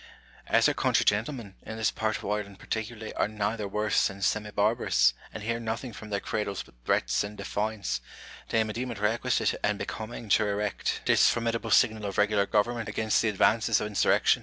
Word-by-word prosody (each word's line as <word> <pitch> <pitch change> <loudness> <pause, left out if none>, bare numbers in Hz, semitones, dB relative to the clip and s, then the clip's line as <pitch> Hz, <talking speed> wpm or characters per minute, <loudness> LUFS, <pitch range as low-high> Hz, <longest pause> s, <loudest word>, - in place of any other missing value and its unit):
As - - +4
our - - +2
country - - +2
gentlemen, 110 0 0
in 110 - -7
this 110 - +1
part 110 -1 -1
of - - -10
Ireland 100 -1 -3
particularly, 110 +1 -5
are - - 0
rather 105 0 -2
worse 105 +1 +1
than 100 0 -7
semi 105 +2 0
barbarous, 100 - +3 0.2
and 105 - -7
hear 115 +2 -1
nothing 115 +2 -4
from 105 +2 -9
their 100 -1 -1
cradles 105 -3 -3
but - - -20
threats 60 +1 +1
and 105 +1 -7
defiance, 100 - -2 0.5
they 115 -1 +3
may 110 -1 -5
deem 125 +3 -3
it 115 - -5
requisite 105 +3 +1
and - - +1
becoming 110 +1 -6
to 105 +2 +4
erect 100 - 0
I20 - - -3
IMAGINARY 105 0 +1
CONVERSATIONS. - - -3
this - - +5
formidable 115 -1 -1
signal 110 0 +3
of 100 - -5
regular 105 -1 +3
government 115 +1 0
against 110 -1 +1
the 110 - +2
advances 110 +2 +3
of - - -2
insurrection. 105 -1 +3
105 Hz, 205 wpm, -28 LUFS, 105-115 Hz, 0.5 s, this